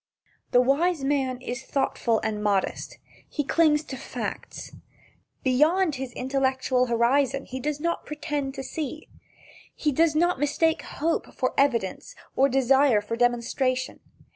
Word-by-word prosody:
The 245 - +5
wise 290 +4 +1
man 270 -2 0
is 245 0 -4
thoughtful 245 -5 0
and 215 -1 -2
modest. 200 -2 -1 0.3
He 295 - -2
clings 305 0 +3
to 270 - -7
facts. 265 - -6 0.7
Beyond 305 +7 +3
his 265 -1 -5
intellectual 260 -1 0
horizon 265 +3 +2
he 260 - -6
does 295 +2 -2
not 340 +2 -2
pretend 295 -2 -3
to 270 - -5
see. 305 +2 -5 0.7
He 300 - 0
does 315 +2 +2
not 345 -2 +2
mistake 320 +3 +1
hope 325 +3 -2
for 255 - -1
evidence 250 - 0 0.2
or 275 +1 +4
desire 265 -2 +4
for 210 +2 -4
demonstration. 245 +2 0
270 Hz, 135 wpm, -26 LUFS, 250-300 Hz, 0.7 s, The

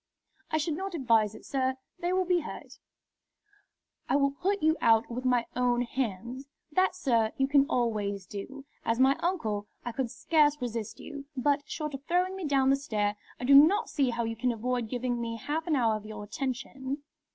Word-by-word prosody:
"I 310 - +1
should 310 +1 0
not 380 +3 -4
advise 225 -7 +2
it, - - -13
sir. 260 -1 0 0.2
They 350 +1 -1
will 370 0 +2
be 360 0 +3
hurt." 305 - -9 1.3
"I - - +3
will 280 -1 +3
put 390 +7 -1
you 315 0 +4
out 225 0 +4
with 250 +2 -4
my 245 -2 +3
own 245 0 +2
hands." 245 +2 -4 0.2
"That, 370 +3 +2
sir, 230 -10 +1
you 270 - +2
can 280 0 +4
always 210 - -1
do. 265 +9 -8 0.2
As 230 +1 0
my 265 +1 +5
uncle, 220 - -1 0.2
I 240 - -2
could 250 +1 -2
scarce 295 +2 +2
resist 230 -4 -4
you. 285 -2 -8
But, 285 +2 +1
short 305 -2 -4
of 275 0 -6
throwing 360 +2 +1
me 380 -3 -5
down 270 -2 +3
the - - +5
stair, 210 -7 -1 0.2
I - - -6
do 270 +3 +5
not 310 +9 +6
see 275 -4 +2
how 235 0 -1
you 225 0 -2
can 245 +2 0
avoid 240 0 -2
giving 245 -1 -2
me 230 0 -3
half 310 +8 -3
an 320 - +2
hour 225 -5 +2
of 215 - -12
your 215 -1 -7
attention." 265 +4 -4
260 Hz, 195 wpm, -29 LUFS, 230-295 Hz, 1.3 s, not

